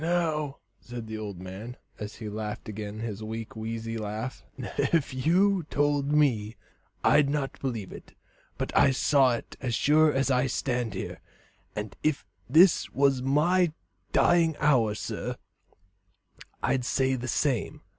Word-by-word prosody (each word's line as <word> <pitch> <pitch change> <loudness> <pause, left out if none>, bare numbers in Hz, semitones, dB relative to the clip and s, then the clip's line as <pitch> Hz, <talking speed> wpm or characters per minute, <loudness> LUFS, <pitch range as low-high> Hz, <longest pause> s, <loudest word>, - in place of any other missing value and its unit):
"Now," 160 -4 0 0.2
said 120 -1 -8
the 110 0 -6
old 100 -4 -6
man, 95 +7 -8 0.2
and 105 - -4
he 110 0 -8
laughed 105 0 -5
again 105 0 -6
his 110 -2 -4
weak, 110 +1 -6
wheezy 115 +1 -4
laugh, 110 +4 -5
"if 155 -5 0
you 180 +8 +3
told 145 0 +1
me, 120 -8 +2 0.5
I'd 145 -2 +5
not 140 -2 -2
believe 115 -8 -3
it; - - -12 0.4
but - - -3
I - - +6
saw 135 -1 +3
it - - -9
as 125 -3 -1
sure 155 +4 +4
as 135 -1 +1
I 125 +1 +3
stand 120 -5 -1
here, - - -5 0.5
and 105 -1 -5
if 155 -2 0 0.2
this 170 +2 +5
was 135 -1 +2
my 155 +6 +3 0.4
dying 165 -2 +4
hour, 125 -8 +3
sir, - - -4 1.3
I'd 130 -2 +1
say 130 +1 +1
the 130 0 -3
same. 130 -2 0
130 Hz, 145 wpm, -28 LUFS, 110-150 Hz, 1.3 s, I